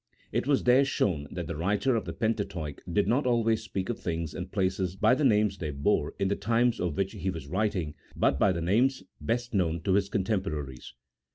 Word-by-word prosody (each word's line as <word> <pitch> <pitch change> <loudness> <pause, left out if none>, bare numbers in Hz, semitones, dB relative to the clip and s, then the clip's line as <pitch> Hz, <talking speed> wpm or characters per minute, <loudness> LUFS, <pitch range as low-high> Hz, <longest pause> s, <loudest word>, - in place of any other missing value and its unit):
It - - -1
was 140 -2 +2
there 125 +3 +5
shown 90 - 0
that - - -5
the - - -4
writer 105 - +1
of 115 - -1
the - - -5
Pentateuch 100 -10 -2
did 100 +4 +2
not 130 +3 +2
always 115 -2 +2
speak 95 -1 -4
of 120 - -3
things 80 -3 -3
and 95 0 -6
places 95 -2 0
by 110 +5 +4
the 150 - +1
names 105 -5 +3
they 80 - -3
bore 70 0 0
in 100 - +1
the 100 - +1
times 115 +2 +1
of 90 -5 -2
which 95 0 0
he 95 - -3
was 80 -6 -5
writing, 90 -2 -1 0.2
but 70 - +2
by 100 - +4
the 85 -2 -2
names 120 +10 +2 0.2
best 120 +1 -2
known 85 -4 +1
to 95 +3 +1
his 100 0 +2
contemporaries. 90 - -3
100 Hz, 210 wpm, -28 LUFS, 85-115 Hz, 0.2 s, there